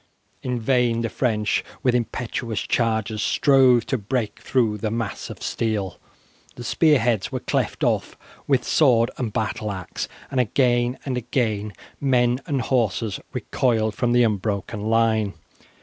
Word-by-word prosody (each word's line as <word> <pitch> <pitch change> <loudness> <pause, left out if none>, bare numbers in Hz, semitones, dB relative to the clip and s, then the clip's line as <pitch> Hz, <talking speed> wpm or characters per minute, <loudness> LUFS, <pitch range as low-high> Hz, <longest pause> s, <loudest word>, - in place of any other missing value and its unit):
In 125 -1 -2
vain 120 -1 +2
the 115 - -1
French, 110 -5 0 0.2
with 125 -3 +3
impetuous 120 -2 -2
charges, 110 -2 0
strove 130 -4 +4
to 130 - -1
break 105 0 -2
through 110 -5 0
the 110 - -1
mass 115 -2 -4
of - - -9
steel. 105 -5 -2 0.6
The 120 - -8
spear 150 +5 +4
heads 115 -5 0
were - - -2
cleft - - -1
off - - 0 0.3
with 135 -3 +2
sword 120 -6 +3
and 120 -4 -2
battle 110 -1 -2
axe, 95 -3 -5 0.2
and 135 - 0
again 120 +1 +2
and 130 -3 -2
again 110 -4 -1 0.3
men 125 -2 +2
and 140 -5 0
horses 115 -4 0
recoiled 110 -4 0
from 120 +3 0
the 120 0 +5
unbroken 105 -1 -1
line. 110 -3 +2
115 Hz, 145 wpm, -23 LUFS, 110-125 Hz, 0.6 s, the